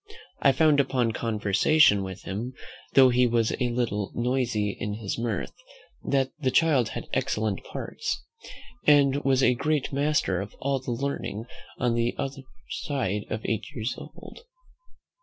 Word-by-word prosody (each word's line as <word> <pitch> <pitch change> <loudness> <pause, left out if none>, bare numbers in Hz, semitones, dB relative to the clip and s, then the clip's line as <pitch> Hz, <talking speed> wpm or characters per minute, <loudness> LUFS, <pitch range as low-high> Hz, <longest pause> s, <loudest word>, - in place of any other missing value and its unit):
I 135 - +6
found 145 +2 +4
upon 125 -4 +1
conversation 110 +3 +3
with 95 -1 -7
him, 115 +7 -4 0.4
though 130 -1 +8
he 125 0 +4
was 115 -1 +1
a 125 -2 +1
little 115 -4 -1
noisy 120 -4 0
in 105 0 -3
his 105 0 -4
mirth, 115 -1 -2 0.5
that 135 -1 +1
the 135 -4 +1
child 140 -5 +3
had - - -6
excellent 110 -2 -1
parts, 445 - -4 0.6
and 140 -2 +5
was 135 -1 +3
a 125 - +5
great 145 +2 -1
master 140 -10 +1
of 105 +2 -8
all 135 0 0
the 130 - -8
learning 120 -3 -3 0.3
on 120 -2 +1
the 120 +1 0
other 135 0 -4 0.3
side 105 - -2 0.2
eight 110 -2 -1
years 115 +2 -2
old. - - -11
125 Hz, 145 wpm, -26 LUFS, 110-135 Hz, 0.6 s, though